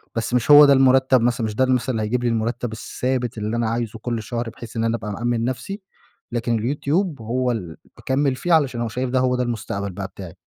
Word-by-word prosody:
بس 115 +1 -2
مش 125 +3 +2
هو 145 0 +10
ده 140 - +6
المرتب 130 -1 +4
مثلًا 120 0 +1
مش 105 -1 -4
ده 130 - +2
اللي 130 0 +3
مثلًا 125 +1 -1
اللي 115 -3 -2
هيجيب 120 +3 -1
لي 120 - +2
المرتب 115 +1 -2
الثابت 125 +2 -3
اللي 105 +1 -2
أنا 115 -1 0
عايزه 115 -1 -3
كل 115 -1 -3
شهر، 120 +1 -3
بحيث 115 +1 -11
إن 115 - 0
أنا 115 0 +1
أبقى 105 -1 -6
مأمن 115 +2 -1
نفسي، 130 - -4 0.5
لكن 120 -1 -1
الYouTube 145 - -1
هو 125 +3 -1
اللى 90 -9 -5 0.2
باكمل 135 0 0
فيه 175 +6 0
علشان 140 -7 +2
أنا 120 -1 -2
شايف 125 +3 -3
ده 130 +1 +1
هو 125 0 +2
ده 125 - 0
المستقبل 105 -4 -3
بقى 95 +1 -5
بتاعي. 95 -3 -10
120 Hz, 235 wpm, -22 LUFS, 115-130 Hz, 0.5 s, هو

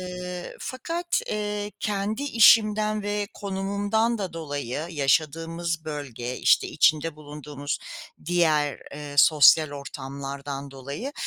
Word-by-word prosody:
Eee, 180 -1 -6
fakat, 335 +7 -2
eee, 210 0 -3
kendi 210 +3 -2
işimden 215 -4 +4
ve 205 0 -2
konumumdan 205 +4 -1
da 195 -3 -4
dolayı 145 -3 -4
yaşadığımız 160 +3 0
bölge, 130 -5 -5
işte, - - +3
içinde 155 +1 +2
bulunduğumuz 145 -1 -6 0.5
diğer, 155 -4 +2
eee, 145 0 -7
sosyal 155 +1 +7
ortamlardan 140 0 -6
dolayı, 140 - -6
165 Hz, 100 wpm, -25 LUFS, 145-205 Hz, 0.5 s, sosyal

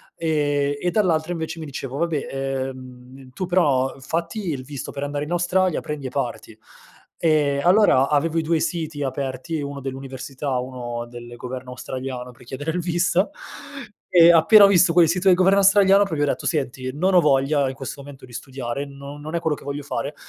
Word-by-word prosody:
Ehm, 145 -3 0
e 180 - 0
dall'altra 175 -5 +1
invece 160 -1 -4
mi 160 - -6
dicevo: 135 -1 -6
"Vabbè, 165 -3 -1
ehm, 130 -1 -6
tu 185 +8 -4
però 145 -8 +2
fatti 170 - -3
il 135 -4 -3
visto 140 0 -7
per 140 0 -5
andare 145 +1 -3
in 165 - -8
Australia, 175 +1 +1
prendi 145 -3 -5
e - - -5
parti." 120 -4 -4 0.6
Ehm, 150 -3 +2
allora 180 -8 +5
avevo 160 +3 +1
i - - +1
2 160 0 +1
siti 155 -4 -3
aperti. 135 +3 -3
1 140 -1 -5
dell'università, 135 0 -5
1 120 -2 -5
del 120 0 -10
governo 125 +1 -7
australiano 130 0 -6
per 125 +1 -18
chiedere 135 +6 -5
il 180 - -2
visto 175 - +1 0.9
e 170 0 +9
appena 170 +6 +7
ho - - +7
visto 180 -3 +4
quel 170 -2 +5
sito 180 +3 -1
del 180 - +6
governo 190 +2 +4
australiano, 200 0 +5
proprio 155 -6 -1
ho - - +1
detto: - - -2
"Senti, 130 -4 -2
non 185 +6 0
ho 180 - +7
voglia 140 -1 +2
in 130 - -5
questo 135 +1 -7
momento 140 -2 -12
di 125 - -16
studiare, 130 +2 -5
non 140 +1 -10
non 155 +3 -7
è 170 - 0
quello 160 -3 -1
che - - -15
voglio 140 +1 -4
fare. 140 +1 -4
145 Hz, 190 wpm, -22 LUFS, 130-170 Hz, 0.9 s, e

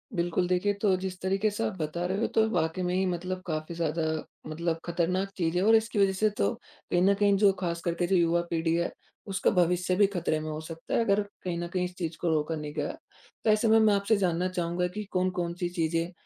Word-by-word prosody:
बिल्कुल। 175 0 0
देखिए, 185 +3 +1
तो 200 -2 +2
जिस 185 -1 -5
तरीके 195 +3 +1
से 210 +2 -3
आप 195 - -3
बता 170 +2 -3
रहे 190 +2 -1
हो, - - +2
तो 220 0 +2
वाक़ई 165 -1 0
में 180 - 0
ही 190 - +2
मतलब 185 +1 -3
काफ़ी 155 +1 -3
ज़्यादा 165 -1 -1 0.4
मतलब 165 +1 -2
खतरनाक 180 +3 0
चीज़ 170 0 0
है 185 - +2
और 220 +2 +6
इसकी 220 -1 +1
वजह 195 -1 +4
से 215 +3 +2
तो 100 - +1
कहीं 175 - -3
न 195 +2 +5
कहीं 200 0 +3
जो 200 -1 +5
खासकर 170 -1 -2
के 175 - +1
जो 195 - +2
युवा 170 -1 +3
पीढ़ी 165 0 0
है, 170 0 0 0.4
उसका 195 -1 +1
भविष्य 180 0 +2
भी 200 0 +5
खतरे 175 -5 -1
में 155 0 -5
हो 155 0 -4
सकता 165 0 -7
है, 235 - +3
अगर 205 -1 +3 0.2
कहीं 175 -2 -2
न 175 - -3
कहीं 180 -1 +1
इस 180 0 -7
चीज़ 165 -3 -4
को 175 - +1
रोका 155 0 0
नहीं 150 -1 -6
गया। 150 -1 -2 0.5
तो 220 - +2
ऐसे 215 +2 +3
में 220 0 +6
मैं 215 -1 +5
आपसे 200 +2 +2
जानना 180 -2 +1
चाहूँगा 175 0 -1
कि 210 - -2
कौन-कौन 180 -2 0
सी 175 - 0
चीज़ें, 165 0 -1
180 Hz, 240 wpm, -28 LUFS, 170-195 Hz, 0.5 s, और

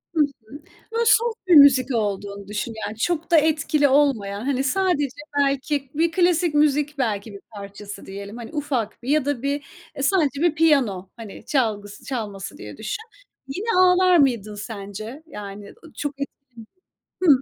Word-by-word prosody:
Hı - - +1 0.3
hı. 280 +7 -11 0.3
Bunun 460 +1 +1
soft 455 -3 +2
bir 350 - +6
müzik 275 -2 +7
olduğunu 200 -2 -3
düşün. 210 +2 -4
Yani, 215 +1 -8
çok 340 +6 -1
da 330 - +7
etkili 300 -1 +3
olmayan, 245 -7 +1
hani, 270 -1 0
sadece 295 -3 0 0.2
belki 275 0 0
bir 330 +2 +1
klasik 345 -2 +2
müzik, 295 0 +2
belki, 215 -4 -2
bir 200 - -9 0.2
parçası 200 +1 -9
diyelim. 200 +3 -8
Hani, 235 -2 -8
ufak 260 -7 -3
bi 265 - -1
ya 305 -3 +2
da 285 -4 -1
bir, 280 +1 -1 0.3
e, 275 - -4
sadece 295 -6 +2
bir 340 -2 +2
piyano, 255 - +2
hani, 225 -4 -10
çalgısı 210 -6 -1
çalması 210 -7 -5
diye 105 - -9
düşün. 220 - -4 0.4
Yine 370 +11 -5
ağlar 365 0 +5
mıydın 235 -8 +2
sence? 215 +6 -7
Yani, 205 -4 -8
ııı, 315 +10 -15
çok 290 - -3 0.9
etkilenir 305 -8 +3
275 Hz, 160 wpm, -23 LUFS, 210-305 Hz, 0.9 s, müzik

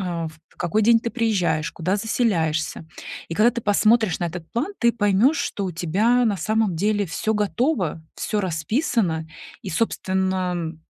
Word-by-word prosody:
э, - - -2
в 165 -2 -6
какой 180 +5 0
день 230 +1 +5
ты 235 - -3
приезжаешь, 185 -9 0
куда 180 +4 -1
заселяешься. 170 -9 -1 0.4
И 165 - -4
когда 220 +5 +4
ты 240 - -4
посмотришь 215 -1 +3
на 175 - 0
этот 170 -1 -7
план, 285 - -1
ты 235 -1 +3
поймёшь, 225 +7 +3
что 200 - -2
у 185 - -3
тебя 205 +10 +2
на 205 -3 +1
самом 215 -2 0
деле 205 +2 +1
всё 215 +7 -1
готово, 210 - 0
всё 210 -1 -2
расписано, 180 - -1 0.4
и, - - -6
собственно, 185 -3 -1
195 Hz, 160 wpm, -23 LUFS, 170-225 Hz, 0.4 s, день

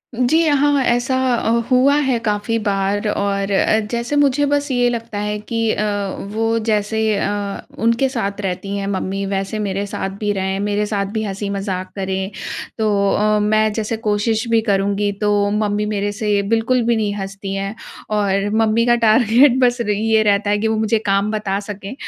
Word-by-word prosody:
जी 255 +8 +2
हाँ, 290 - +3
हाँ, 290 +1 +3
हाँ 280 -2 +2
ऐसा 245 +2 +1 0.2
अ, 225 - -1 0.2
हुआ 260 +3 +5
है 265 -4 +1
काफ़ी 220 +1 -1
बार 205 0 -1
और 200 -1 -1
अ, 210 +2 +3
जैसे 235 +4 -2
मुझे 290 0 +3
बस 290 0 0
ये 245 -1 +2
लगता 230 -3 -4
है 210 0 -2
कि 225 +1 -1
अ, 210 - -1 0.5
वो 225 +1 0
जैसे 215 +1 0 0.2
अ, 200 0 -2 0.2
उनके 230 +4 +2
साथ 210 -6 -3
रहती 195 +1 -3
हैं 200 0 -3
मम्मी, 195 0 -2
वैसे 195 +2 -3
मेरे 200 -1 -2
साथ 195 -1 -4
भी 210 -1 0
रहें, 190 0 -2
मेरे 205 +1 0
साथ 205 -1 -1
भी 220 -1 -1
हँसी-मज़ाक 195 -2 -4
करें। 190 0 -3 0.5
तो 220 -1 0 0.3
अ, 210 0 +2
मैं 215 +1 +2
जैसे 220 +1 -2
कोशिश 220 +1 0
भी 230 -1 +3
करूँगी, 200 -1 0
तो 205 0 +1
मम्मी 210 0 0
मेरे 205 -1 -1
से 205 -1 0
बिल्कुल 230 +2 +2
भी 235 0 +2
नहीं 210 -2 -1
हँसती 195 0 -5
हैं 195 +2 -3 0.3
और 205 -1 0
मम्मी 225 +1 +2
का 240 0 +4
टारगेट 240 +4 +5
बस 245 -1 +3
र 210 - -3
ये 220 0 +3
रहता 205 0 +2
है 205 - +2
कि 220 +2 0
वो 220 - +1
मुझे 220 +1 +1
काम 195 +1 +1
बता 200 -2 -1
सकें 205 +1 -7
210 Hz, 190 wpm, -19 LUFS, 200-230 Hz, 0.5 s, हुआ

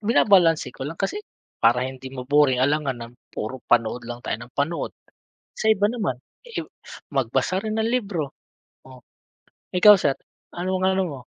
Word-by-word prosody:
binabalanse 185 - +4
ko 135 - -6
lang 165 - -7
kasi 205 - -2 0.4
para 120 +2 +4
hindi 130 0 -7
ma-boring, 135 +1 +2
alangan 140 -1 +1
na 115 0 -8 0.2
puro 125 +4 -5
panood 120 0 +2
lang 120 0 -7
tayo 110 - -3
nang 120 +2 -11
panood. 155 +4 -1 0.6
Sa 220 0 +3
iba 205 0 +2
naman, 195 - -2 0.2
eh, 475 - -5 0.5
magbasa 135 +5 0
rin 220 0 -1
ng 220 - +1
libro. 200 - -2 0.5
Oh, 130 -3 -15 0.7
ikaw, 210 +3 +9
sir, 140 -2 +1 0.4
anong 185 +1 -1
ano 190 0 +2
mo? 140 -7 -6
145 Hz, 155 wpm, -24 LUFS, 130-195 Hz, 0.7 s, ikaw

